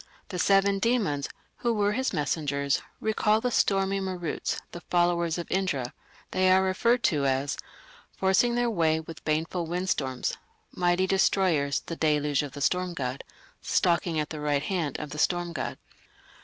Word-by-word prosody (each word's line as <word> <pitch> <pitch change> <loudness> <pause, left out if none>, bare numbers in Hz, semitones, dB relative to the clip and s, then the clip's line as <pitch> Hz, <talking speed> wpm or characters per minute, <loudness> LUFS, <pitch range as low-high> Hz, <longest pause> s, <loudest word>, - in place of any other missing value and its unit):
The 180 - -4
seven 195 +1 +3
demons, 195 - 0 0.3
who 235 -1 0
were 205 -1 +2
his 260 +5 0
messengers, 145 -3 0 0.2
recall 215 0 +2
the 250 +2 -1
stormy 195 -2 +2
Maruts, 180 -4 -3
the 175 - -8
followers 175 -1 +2
of 170 - -4
Indra. 150 -10 -1 0.4
They 185 0 +3
are 190 +1 +5
referred 235 +6 +2
to 145 -4 +2
as 135 +1 0 0.6
Forcing 190 +6 +3
their 240 0 +2
way 160 -5 +2
with 160 +1 -10
baneful 165 +3 -1
windstorms, 160 -7 -1 0.3
Mighty 175 +1 +2
destroyers, 185 -7 +2
the 165 - -5
deluge 150 -2 +1
of 145 -3 -6
the 145 - -7
storm 180 +3 0
god, 130 -3 -3 0.4
Stalking 170 -2 +1
at 150 - -3
the 155 - -5
right 145 -1 0
hand 165 -7 -2
of 150 -2 -6
the 150 - -6
storm 175 +1 +1
god. 130 - -4
175 Hz, 155 wpm, -27 LUFS, 150-190 Hz, 0.6 s, are